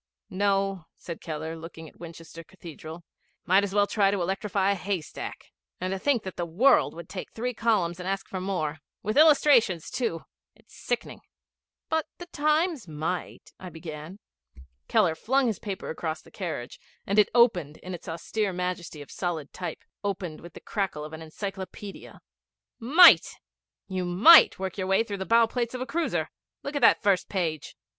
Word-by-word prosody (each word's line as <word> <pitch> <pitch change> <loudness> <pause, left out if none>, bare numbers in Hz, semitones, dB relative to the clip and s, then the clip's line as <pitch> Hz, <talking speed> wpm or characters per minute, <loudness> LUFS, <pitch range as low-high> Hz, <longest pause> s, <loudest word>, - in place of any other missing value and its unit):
'No,' 195 -2 0
said 170 -2 -8
Keller, 160 0 -5
looking 160 0 -10
at - - -18
Winchester 165 0 -10
Cathedral. 165 -1 -11 0.4
''Might 190 +2 +5
as 200 -1 -3
well 205 0 +5
try 200 -1 +2
to 200 0 0
electrify 195 +2 0
a - - +3
haystack. 190 -4 -5 0.3
And 185 +1 -2
to 195 - -3
think 260 -1 +1
that 190 - -7
the 175 - -1
World 235 +9 +3
would 170 -1 -9
take 190 - -7
three 250 +2 -3
columns 200 -7 0
and 180 +1 -4
ask 195 0 -3
for 185 - -5
more 160 -6 -2 0.2
with 215 +2 -2
illustrations 280 - +5
too! 230 -10 -2 0.3
It's - - -24
sickening.' - - -4 0.7
'But 320 -1 +1
the 350 - -8
Times 305 - 0
might,' 160 +3 -5
I 185 - -8
began. 160 +2 -8 0.7
Keller 205 -8 +3
flung 265 +11 +1
his 220 -5 -1
paper 200 -3 -5
across 160 0 -4
the - - -18
carriage, 160 -10 -5 0.3
and 200 +2 +2
it 210 - +5
opened 180 - +3
in 185 +2 -8
its 170 - -8
austere 195 +5 -2
majesty 180 -4 -4
of - - -16
solid 165 -5 -4
type 180 - -6 0.2
opened 185 -5 -4
with 170 -1 -12
the - - -10
crackle 190 -8 -3
of 155 - -10
an 160 - -8
encyclopædia. 195 +4 -8 0.6
'Might! 300 +10 +7 0.5
You 185 -1 -3
might 205 - +7
work 190 0 -5
your 185 - -2
way 195 +3 +3
through 205 -3 -5
the 190 - -4
bow 230 0 +5
plates 240 +1 -3
of - - -4
a - - -2
cruiser. 335 +4 -2 0.3
Look 280 +1 -5
at 285 - -1
that - - +5
first 195 -4 +2
page!' 165 -6 -3
190 Hz, 175 wpm, -27 LUFS, 165-215 Hz, 0.7 s, Might